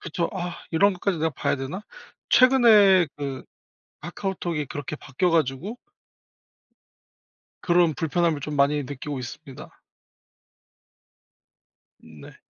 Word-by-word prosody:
그쵸. 170 Hz, +1 st, -3 dB
'아 180 Hz, -2 st, -5 dB
이런 200 Hz, +5 st, +3 dB
것까지 180 Hz, -1 st, -2 dB
내가 160 Hz, +1 st, 0 dB
봐야 140 Hz, -, -1 dB
되나?' 140 Hz, +10 st, -6 dB, 0.5 s
최근에 215 Hz, -9 st, +6 dB
그 140 Hz, -2 st, -5 dB, 0.6 s
카카오톡이 175 Hz, -2 st, -4 dB
그렇게 145 Hz, +2 st, -6 dB
바뀌어 150 Hz, +5 st, -2 dB
가지고 165 Hz, -, -1 dB, 1.9 s
그런 175 Hz, -2 st, +3 dB
불편함을 165 Hz, -1 st, 0 dB
좀 150 Hz, +2 st, -5 dB
많이 145 Hz, +1 st, +2 dB
느끼고 140 Hz, +1 st, -6 dB
있습니다. 135 Hz, +3 st, -10 dB, 2.2 s
네. -, -, -14 dB
160 Hz, 235 characters per minute, -24 LUFS, 145-185 Hz, 2.2 s, 최근에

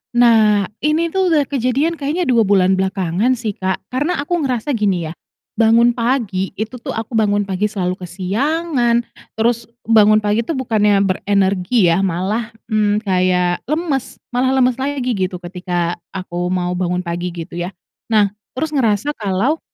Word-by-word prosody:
Nah, 220 Hz, -4 st, +5 dB, 0.2 s
ini 320 Hz, +2 st, +1 dB
tuh 380 Hz, -1 st, +1 dB
udah 310 Hz, -4 st, +3 dB
kejadian 275 Hz, +5 st, 0 dB
kayaknya 305 Hz, +6 st, -1 dB
2 235 Hz, -, +3 dB
bulan 190 Hz, -1 st, +3 dB
belakangan 190 Hz, +5 st, 0 dB
sih, 225 Hz, -3 st, -3 dB
Kak, 190 Hz, -1 st, -3 dB
karena 290 Hz, +8 st, 0 dB
aku 350 Hz, +3 st, -1 dB
ngerasa 260 Hz, -1 st, -1 dB
gini 190 Hz, -, 0 dB
ya, -, -, -8 dB, 0.5 s
bangun 230 Hz, +2 st, +5 dB
pagi, 230 Hz, -6 st, -1 dB
itu 220 Hz, +4 st, -5 dB
tuh -, -, -5 dB
aku 225 Hz, +2 st, -5 dB
bangun 205 Hz, -2 st, +2 dB
pagi 195 Hz, +1 st, -1 dB
selalu 185 Hz, -3 st, -3 dB
kesiangan. 240 Hz, -, 0 dB, 0.3 s
Terus 230 Hz, +1 st, 0 dB, 0.2 s
bangun 215 Hz, -1 st, +5 dB
pagi 210 Hz, +2 st, +1 dB
itu 330 Hz, -, -1 dB
bukannya 210 Hz, -5 st, +2 dB
berenergi 195 Hz, +1 st, +2 dB
ya, 170 Hz, -, +2 dB
malah, 195 Hz, +5 st, -1 dB, 0.2 s
mmm, 210 Hz, 0 st, +1 dB
kayak 180 Hz, -2 st, +1 dB
lemes, 305 Hz, -4 st, -2 dB, 0.2 s
malah 255 Hz, +2 st, +1 dB
lemes 255 Hz, -1 st, +2 dB
lagi 265 Hz, -2 st, -1 dB
gitu 185 Hz, -3 st, -1 dB
ketika 175 Hz, -1 st, -3 dB, 0.2 s
aku 175 Hz, -1 st, -3 dB
mau 180 Hz, -1 st, -1 dB
bangun 180 Hz, 0 st, -1 dB
pagi, 175 Hz, 0 st, -3 dB
gitu 170 Hz, +1 st, -6 dB
ya. 175 Hz, +2 st, -4 dB, 0.3 s
Nah, 210 Hz, -3 st, +3 dB, 0.2 s
terus 310 Hz, +3 st, -2 dB
ngerasa 235 Hz, -1 st, +1 dB
kalau 220 Hz, +6 st, -1 dB
215 Hz, 155 wpm, -18 LUFS, 185-255 Hz, 0.5 s, Nah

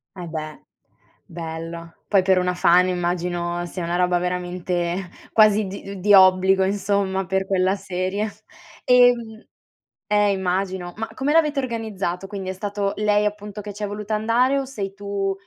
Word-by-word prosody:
Eh, 180 Hz, -2 st, -7 dB
beh. 155 Hz, -1 st, -6 dB, 0.6 s
Bello. 165 Hz, 0 st, -7 dB
Poi 195 Hz, -3 st, +3 dB
per 190 Hz, 0 st, +3 dB
una 180 Hz, 0 st, 0 dB
fan 180 Hz, +1 st, +4 dB
immagino 175 Hz, -1 st, -2 dB
sia 180 Hz, 0 st, -6 dB
una 170 Hz, +1 st, -2 dB
roba 180 Hz, 0 st, +2 dB
veramente 180 Hz, 0 st, -2 dB, 0.2 s
quasi 215 Hz, -1 st, +4 dB
di 195 Hz, 0 st, -8 dB
di 205 Hz, +3 st, +3 dB
obbligo, 190 Hz, 0 st, +5 dB
insomma, 195 Hz, -1 st, 0 dB
per 190 Hz, +1 st, 0 dB
quella 190 Hz, 0 st, +1 dB
serie. 195 Hz, +2 st, -3 dB, 0.5 s
Ehm 245 Hz, -3 st, +3 dB, 0.7 s
eh, 205 Hz, -1 st, +4 dB
immagino. 185 Hz, -1 st, -2 dB
Ma 225 Hz, +1 st, -3 dB
come 275 Hz, +2 st, -1 dB
l'avete 300 Hz, -3 st, +3 dB
organizzato? 210 Hz, -7 st, -3 dB
Quindi 195 Hz, -2 st, -6 dB
è -, -, -2 dB
stato 200 Hz, +1 st, -2 dB
lei 210 Hz, 0 st, +2 dB
appunto 210 Hz, 0 st, -4 dB
che 205 Hz, 0 st, -8 dB
ci 210 Hz, -, -11 dB
è -, -, -1 dB
voluta 210 Hz, +1 st, -5 dB
andare 235 Hz, +6 st, +2 dB
o 270 Hz, -, -3 dB
sei 205 Hz, -7 st, -5 dB
tu 200 Hz, -1 st, -2 dB
195 Hz, 155 wpm, -22 LUFS, 180-210 Hz, 0.7 s, obbligo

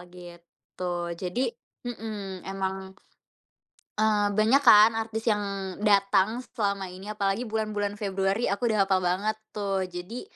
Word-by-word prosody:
gitu. 175 Hz, 0 st, -12 dB, 0.4 s
Jadi 180 Hz, +5 st, -3 dB, 0.5 s
mhm, 210 Hz, -5 st, -6 dB
emang 190 Hz, 0 st, -4 dB, 1.0 s
eee, 210 Hz, -1 st, +3 dB
banyak 215 Hz, +7 st, +3 dB
kan 220 Hz, -4 st, +8 dB
artis 225 Hz, 0 st, -3 dB
yang 210 Hz, -3 st, +2 dB, 0.4 s
datang 205 Hz, +3 st, +3 dB
selama 200 Hz, -4 st, -1 dB
ini, 185 Hz, +3 st, -9 dB
apalagi 210 Hz, +3 st, -1 dB
bulan-bulan 210 Hz, -2 st, -2 dB
Februari. 195 Hz, +2 st, 0 dB
Aku 230 Hz, +4 st, 0 dB
udah 210 Hz, -3 st, +3 dB
hapal 190 Hz, -1 st, +2 dB
banget 185 Hz, +5 st, 0 dB, 0.2 s
tuh, 195 Hz, -3 st, -2 dB
jadi, 180 Hz, +7 st, -6 dB
205 Hz, 120 wpm, -27 LUFS, 190-220 Hz, 1.0 s, kan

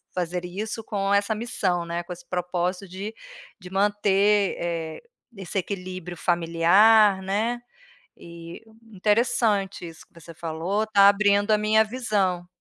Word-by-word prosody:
fazer 180 Hz, 0 st, -3 dB
isso 215 Hz, +5 st, -5 dB
com 200 Hz, -1 st, -1 dB
essa 200 Hz, +2 st, +1 dB
missão, 185 Hz, -6 st, -2 dB
né, 170 Hz, +1 st, -3 dB
com 175 Hz, -, -12 dB
esse 175 Hz, 0 st, -15 dB
propósito 180 Hz, +2 st, -2 dB
de 195 Hz, +4 st, -7 dB, 0.5 s
de 180 Hz, -2 st, -11 dB
manter, 205 Hz, 0 st, +2 dB
eh, 165 Hz, -2 st, -4 dB, 0.3 s
esse 195 Hz, 0 st, -6 dB
equilíbrio 185 Hz, -2 st, -5 dB
familiar, 185 Hz, +5 st, +4 dB
né, 220 Hz, +5 st, -1 dB, 0.6 s
eh, 170 Hz, 0 st, -11 dB, 0.3 s
interessante 205 Hz, -2 st, 0 dB
isso 165 Hz, -1 st, -12 dB
que -, -, -39 dB
você 165 Hz, +1 st, -12 dB
falou, 170 Hz, +6 st, -2 dB
está 200 Hz, -2 st, +5 dB
abrindo 205 Hz, +1 st, +3 dB
a 215 Hz, -, +5 dB
minha 215 Hz, +1 st, +3 dB
visão. 210 Hz, -7 st, -1 dB
195 Hz, 135 wpm, -24 LUFS, 175-210 Hz, 0.6 s, está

